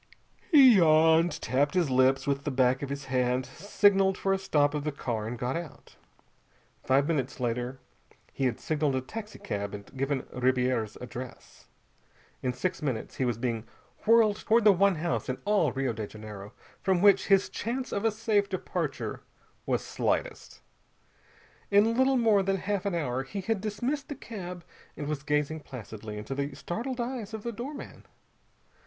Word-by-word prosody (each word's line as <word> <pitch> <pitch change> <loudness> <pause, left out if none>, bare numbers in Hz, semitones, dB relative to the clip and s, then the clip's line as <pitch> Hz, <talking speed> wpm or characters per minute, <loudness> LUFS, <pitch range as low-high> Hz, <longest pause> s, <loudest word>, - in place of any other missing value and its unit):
He 265 - +8
yawned, 160 -1 +4
tapping 145 +7 +2
his 160 -6 0
lips 130 +1 +3
with 140 0 -1
the - - -1
back 130 -1 +2
of 140 - -4
his 140 0 -5
hand, 125 0 0
signaled 195 +5 +2
for 195 - +1
a 195 - 0
stop 145 -6 +2
of 150 -1 -2
the 150 - -1
car, 115 -6 -3
and 120 +2 -4
got 125 +3 -2
out. 165 -4 -8 0.9
Five 135 +2 +3
minutes 140 -6 -1
later 125 +2 -2 0.5
he 135 - -1
had 120 -3 0
signaled 150 -3 0
a 130 - 0
taxicab 130 - -5
and 100 +5 -12
given 135 0 -1
Ribiera's 125 -3 0
address. 125 0 -9 0.7
In 130 - 0
six 170 +9 -3
minutes 130 -7 -3
he 130 - +1
was 120 -3 0
being 115 -2 -3 0.4
whirled 220 -2 +5
toward 230 +1 +2
the 210 - +8
one 195 0 +3
house 165 -3 -2
in 130 - -1
all 200 -9 +3
Rio 135 -2 -1
de 110 -1 -5
Janeiro 105 -1 -10 0.3
from 190 -2 +2
which 200 -2 +5
his 195 -1 +4
chance 250 +4 -4
of 200 - -2
a 225 - +4
safe 210 -2 0
departure 185 - -3 0.5
was - - 0
slightest. - - -2 1.1
In 210 +3 +4
little 260 +1 +3
more 220 -4 +4
than 195 0 0
half 200 +1 -2
an 190 - -1
hour 130 -6 -1
he 195 +9 -5
had 205 +1 -1
dismissed 245 +9 -3
the 290 - -4
cab 180 -9 -8 0.3
and 150 - -4
was 150 -2 -2
gazing 150 +1 0
placidly 110 -6 -8
into 105 +5 -5
the 140 0 -3
startled 245 +8 -4
eyes 235 -3 -4
of 215 - -8
the 235 - -3
doorman. 255 +6 -8
155 Hz, 170 wpm, -28 LUFS, 130-205 Hz, 1.1 s, He